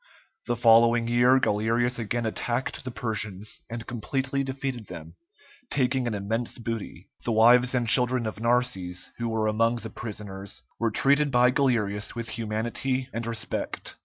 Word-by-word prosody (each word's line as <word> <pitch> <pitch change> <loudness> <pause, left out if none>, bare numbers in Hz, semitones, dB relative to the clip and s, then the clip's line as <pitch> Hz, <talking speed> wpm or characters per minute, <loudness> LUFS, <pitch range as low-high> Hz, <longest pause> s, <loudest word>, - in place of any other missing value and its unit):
The 120 - +1
following 115 0 +5
year 120 +2 +4
Galerius 115 +3 +1
again 115 +1 -2
attacked 120 +3 -2
the 130 - -5
Persians, 110 -4 -4
and 115 0 -6
completely 130 +5 -2
defeated 130 -4 -4
them, 80 0 -9 0.6
taking 130 -2 +1
an 110 - -2
immense 110 +4 -2
booty. 115 -2 -6 0.2
The 120 - -1
wives 120 +3 +5
and 120 -2 0
children 125 0 +5
of 110 -1 -5
Narses, 115 -7 -1
who 120 0 -1
were 110 -1 0
among 115 +2 +2
the 115 -1 -7
prisoners, 100 -3 -7 0.2
were 115 - +1
treated 140 +6 +3
by 125 -1 +4
Galerius 115 -7 0
with 115 -1 -4
humanity 120 +4 -2
and 115 0 -3
respect. 115 -1 -3
115 Hz, 150 wpm, -26 LUFS, 110-125 Hz, 0.6 s, following